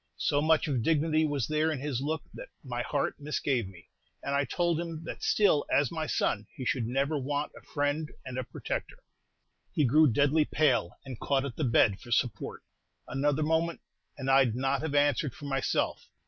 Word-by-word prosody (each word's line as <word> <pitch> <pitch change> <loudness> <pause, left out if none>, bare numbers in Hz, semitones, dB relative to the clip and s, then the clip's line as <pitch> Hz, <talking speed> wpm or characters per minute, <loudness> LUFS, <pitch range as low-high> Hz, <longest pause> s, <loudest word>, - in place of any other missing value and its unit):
So 145 - +1
much 160 +1 +3
of 135 -5 0
dignity 155 +2 +2
was 145 -4 -1
there 155 +1 +1
in 150 - -3
his 135 -3 -2
look 155 +2 -2
that - - -9
my 120 -3 -3
heart 140 +4 -1
misgave 140 -6 -1
me; 85 -4 -14 0.4
and 140 - -2
I 140 0 +2
told 170 0 0
him 165 -2 -5
that 170 - -7
still, 195 -8 +3
as 140 -2 +3
my 160 -2 -3
son, 105 -6 0
he 130 - -6
should 120 -2 0
never 140 +4 0
want 145 +2 -2
a - - -12
friend 145 +1 -1 0.2
and 130 - -6
a - - -2
protector. - - -5 0.7
He 150 - +2
grew 150 +5 +5
deadly 145 +5 +3
pale, 135 - +1
and 130 -4 -7
caught 140 -1 +1
at 130 -4 -5
the - - -2
bed 115 -4 +3
for 120 - -12
support. 120 -1 -1 0.4
Another 145 +3 0
moment, 160 +2 +1 0.4
and 135 -2 -5
I 135 0 +6
'd 115 -2 -2
not 135 +2 0
have 155 -2 -2
answered 145 -2 +2
for 145 - -10
myself. 135 -2 -1
145 Hz, 195 wpm, -29 LUFS, 130-155 Hz, 0.7 s, I